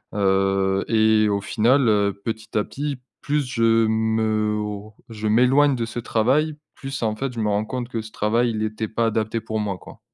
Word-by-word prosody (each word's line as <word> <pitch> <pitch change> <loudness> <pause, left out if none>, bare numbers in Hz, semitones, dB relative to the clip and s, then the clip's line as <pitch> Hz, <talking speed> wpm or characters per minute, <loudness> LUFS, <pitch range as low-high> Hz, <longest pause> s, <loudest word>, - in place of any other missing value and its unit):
heu, 95 -1 +1
et 110 -1 +3
au 100 -1 0
final, 120 +5 +2
heu, 100 -1 +2
petit 110 0 -4
à 105 - +2
petit, 145 +3 -4 0.2
plus 145 0 -1
je 115 -3 +2
m'or 110 -1 -1
je 110 -1 -4
m'éloigne 130 +6 +4
de 115 -2 -2
ce 120 +1 -6
travail, 135 +8 +1 0.2
plus 135 -2 -6
en 110 -1 -1
fait 135 0 -3
je 115 - -4
me 105 - 0
rends 105 +1 0
compte 125 +1 -5
que 115 -3 -3
ce 110 0 -11
travail, 115 +3 +1
il 110 -1 -2
était 110 0 -3
pas 115 +2 0
adapté 110 0 -1
pour 110 0 -3
moi, 100 -3 -2
quoi. - - -14
110 Hz, 195 wpm, -22 LUFS, 105-120 Hz, 0.2 s, m'éloigne